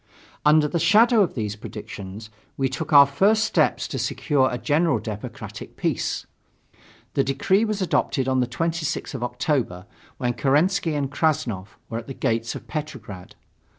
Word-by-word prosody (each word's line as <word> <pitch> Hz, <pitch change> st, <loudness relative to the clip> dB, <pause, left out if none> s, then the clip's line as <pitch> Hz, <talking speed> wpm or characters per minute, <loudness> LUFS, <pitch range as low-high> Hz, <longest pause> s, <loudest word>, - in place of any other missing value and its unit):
Under 150 Hz, 0 st, +5 dB
the 170 Hz, -, -1 dB
shadow 225 Hz, +4 st, +5 dB
of 185 Hz, -, +1 dB
these 105 Hz, -4 st, -2 dB
predictions 105 Hz, -1 st, -8 dB, 0.3 s
we 135 Hz, -, +1 dB
took 155 Hz, +6 st, -5 dB
our 140 Hz, -1 st, +9 dB
first 200 Hz, +10 st, +3 dB
steps 220 Hz, -, +1 dB
to -, -, -3 dB
secure 135 Hz, -4 st, +1 dB
a 125 Hz, -, -2 dB
general 145 Hz, +4 st, +2 dB
democratic 105 Hz, -1 st, -7 dB
peace. -, -, -1 dB, 0.9 s
The 135 Hz, -, +2 dB
decree 185 Hz, +11 st, +2 dB
was 210 Hz, -3 st, -1 dB
adopted 140 Hz, -5 st, 0 dB
on 130 Hz, 0 st, +2 dB
the 125 Hz, -, +1 dB
26th 165 Hz, +5 st, -2 dB
of 130 Hz, -, -5 dB
October, 125 Hz, -, -1 dB, 0.3 s
when 125 Hz, -2 st, -1 dB
Kerensky 155 Hz, +5 st, +2 dB
and 140 Hz, -2 st, -2 dB
Krassnov 115 Hz, -, -1 dB
were 115 Hz, -, -4 dB
at 115 Hz, -, -11 dB
the 135 Hz, -, -7 dB
gates 115 Hz, 0 st, -1 dB
of -, -, -9 dB
Petrograd. 130 Hz, -, -7 dB
135 Hz, 155 wpm, -24 LUFS, 115-160 Hz, 0.9 s, our